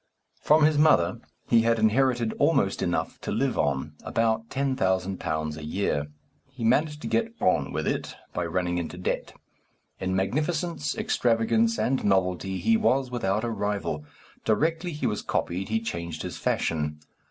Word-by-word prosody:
From 155 +1 +5
his 150 -1 +4
mother 150 - +4 0.3
he 115 - +5
had 115 0 +2
inherited 120 +1 +2
almost - - +2
enough - - -1
to - - -4
live - - 0
on, 70 +1 0
about 115 0 0
£10,000 95 - -1
a 80 - -8
year. 75 -3 -1 0.4
He 130 -3 -8
managed 150 +6 +2
to - - -3
get 230 0 0
on 90 - +2
with - - -2
it - - -2 0.2
by 90 -1 -1
running 90 +1 -1
into 85 +1 -5
debt. 90 - -3 0.7
In 95 0 -1
magnificence, 150 - -1
extravagance, 125 - +2
and 130 +1 0
novelty 95 -1 +1
he 225 - +3
was 135 - +1
without 105 -3 0
a 120 - -1
rival. 100 -8 -2 0.4
Directly 160 - +1
he 150 -4 -4
was 105 -3 0
copied 95 +4 -2
he 110 +1 +1
changed 85 -7 -5
his - - -5
fashion. 75 -2 -1
110 Hz, 155 wpm, -26 LUFS, 90-135 Hz, 0.7 s, From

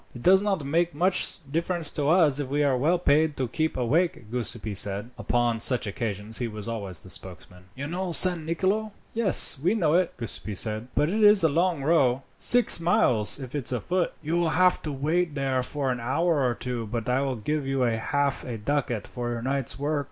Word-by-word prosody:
"It 120 - -9
does 190 +2 +6
not 195 -8 -1
make 170 +3 0
much 185 +4 +1
difference 170 0 0
to 145 -1 -1
us, 160 -5 +4
if 145 - -3
we 145 +2 0
are 140 -2 +2
well 155 +8 +1
paid, 155 -2 +1
to 130 - -1
keep 155 +6 -2
awake," 130 -2 -1
Giuseppi 115 -3 -3
said. 100 +3 -1
Upon 120 0 -1
such 120 +1 0
occasions 105 0 -3
he 120 - -2
was 105 -1 -7
always 100 -6 -5
the 95 - -14
spokesman. 90 0 -9
"You 140 - -6
know 180 +4 -4
San 175 -1 +5
Nicolo?" 195 +6 -1 0.2
"Yes, 210 - +4
I 185 +6 +2
know 160 -8 +1
it," 180 +1 +1
Giuseppi 110 -2 -3
said; 110 +3 -1
"but 150 - +2
it 215 +4 -1
is 210 -3 +6
a 160 - +4
long 165 -1 0
row 135 -4 +2 0.2
six 245 -7 +4
miles, 125 -11 +2
if 130 -3 -9
it's 140 -5 -2
a 125 - -1
foot." 175 - -1
"You 165 +3 -1
will 170 -2 +1
have 180 0 +3
to 155 - -4
wait 155 +4 -1
there 135 -2 -1
for 135 +1 -3
an 125 - -3
hour 145 +6 0
or 120 - -2
two, 120 -3 -5
but 115 +1 -4
I 125 +2 +1
will 135 -2 -2
give 145 +5 -3
you 135 -1 -1
half 125 +4 -1
a 120 -3 -6
ducat 120 -1 -2
for 120 -1 -5
your 120 -1 -4
night's 135 -1 -2
work." 145 +2 -1
140 Hz, 210 wpm, -25 LUFS, 120-170 Hz, 0.2 s, does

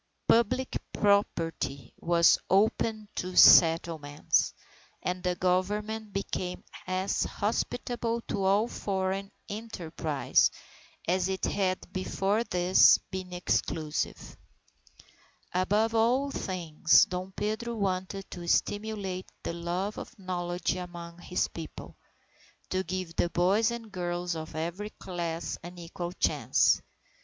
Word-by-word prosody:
Public 250 +3 +2
property 165 - 0
was 170 0 +4
opened 215 +1 +2
to 185 0 -3
settlement, 160 -3 +5 0.5
and 180 0 -2
the 180 -1 0
Government 210 +4 -1
became 185 -2 -3 0.2
as 185 +1 0
hospitable 235 +2 -2
to 200 - -3
all 200 +4 +3
foreign 195 -2 -2 0.2
enterprise 170 -9 0 0.6
as 185 +2 +1
it 190 0 -1
had 185 -2 -1
before 195 +3 0
this 180 -3 +5
been 185 -1 -5
exclusive. 160 -3 -2 1.2
Above 205 +5 +2
all 250 +5 +2
things, 165 - +3
Dom 180 +1 -5
Pedro 220 +4 -2
wanted 195 -1 -2
to 175 -2 -7
stimulate 205 -1 -1
the - - -3
love 175 +4 -3
of - - -9
knowledge 175 -2 -2
among 175 -1 -8
his 180 +1 -1
People, 165 -2 -9 0.8
to 185 0 0
give 185 -1 -4
the 175 - +2
boys 195 +7 +3
and 235 -2 -6
girls 175 -1 -2
of 160 0 -7
every 170 +6 -3
class 170 -4 -4
an 175 +2 -10
equal 175 0 -5
chance. 180 - +2
185 Hz, 110 wpm, -29 LUFS, 175-205 Hz, 1.2 s, settlement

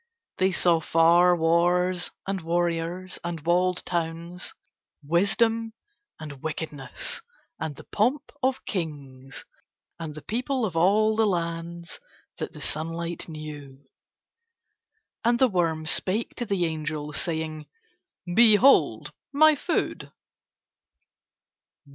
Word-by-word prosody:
They 190 +1 +3
saw 175 -2 +3
far 170 +3 +5
wars 175 +2 +2 0.2
and 195 -1 -2
warriors 170 +2 -1
and 170 -1 -4
walled 180 +1 +2
towns, 170 +1 -3 0.5
wisdom 220 +8 +1 0.5
and 145 -4 -9
wickedness, 150 -4 -5 0.4
and 150 -2 -4
the - - -12
pomp 260 +8 0
of 260 0 0
kings, 140 -7 -5 0.5
and 155 -3 -6
the 150 - -9
people 250 +2 -1
of 180 -6 -4
all 210 +6 +3
the 220 0 +3
lands 170 -1 -3 0.4
that - - -4
the - - -11
sunlight 165 +2 -3
knew. 145 -3 -9 1.4
And 235 +1 +3
the 260 - +5
worm 165 -6 0
spake 195 +7 +1
to 240 - -3
the 195 -4 +1
angel 155 -2 -4
saying: 160 -1 -3 0.7
"Behold 230 +5 +5 0.2
my 310 +2 +6
food." 325 +3 -2
170 Hz, 105 wpm, -26 LUFS, 160-200 Hz, 1.4 s, my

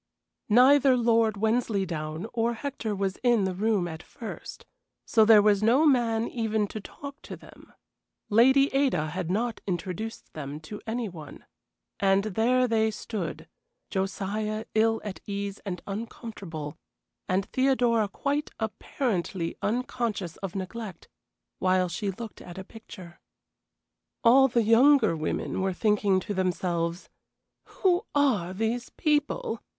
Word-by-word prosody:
Neither 260 +3 +6
Lord 230 -2 +3
Wensleydown 195 -7 -1
or 235 0 0
Hector 230 -4 -4
was 195 -1 -2
in 240 -4 +3
the 190 -1 -1
room 200 -1 +1
at 160 -1 -7
first, 230 +4 -9 0.4
so 220 - +4
there 215 -2 +7
was 205 -1 +4
no 245 +8 +4
man 235 -5 +2
even 220 -3 -1
to 215 - -6
talk 280 +7 -10
to - - -8
them. - - -16 0.6
Lady 265 +6 +5
Ada 255 - +1
had 180 0 -3
not 225 +4 -1
introduced 190 +4 -4
them 145 -1 -6
to 205 +7 -8
any 230 +1 -2
one. 155 -6 -11 0.5
And 195 0 +3
there 230 +5 +2
they 220 -1 +2
stood: 185 -7 -5 0.4
Josiah 210 +3 -2
ill 225 +1 +2
at 205 -3 -6
ease 200 0 -4
and 180 -2 -4
uncomfortable, 195 -8 -7 0.5
and 190 +1 +1
Theodora 245 -4 +2
quite 285 +7 -2
apparently 210 - -2
unconscious 225 -6 -2
of 195 -2 -6
neglect, 195 +1 -6 0.5
while 185 0 +2
she 195 +4 -3
looked 220 +3 -7
at 175 0 -10
a 190 - -5
picture. 185 -5 -12 1.0
All 265 +3 +7
the 235 -2 +1
younger 250 - +5
women 155 +4 -2
were 190 0 0
thinking 205 -1 +2
to 205 - -4
themselves: 175 -2 -1 0.7
"Who 375 +1 +2
are 240 -12 +2
these 225 +5 -2
people? 295 -7 -1
215 Hz, 130 wpm, -27 LUFS, 185-235 Hz, 1.0 s, there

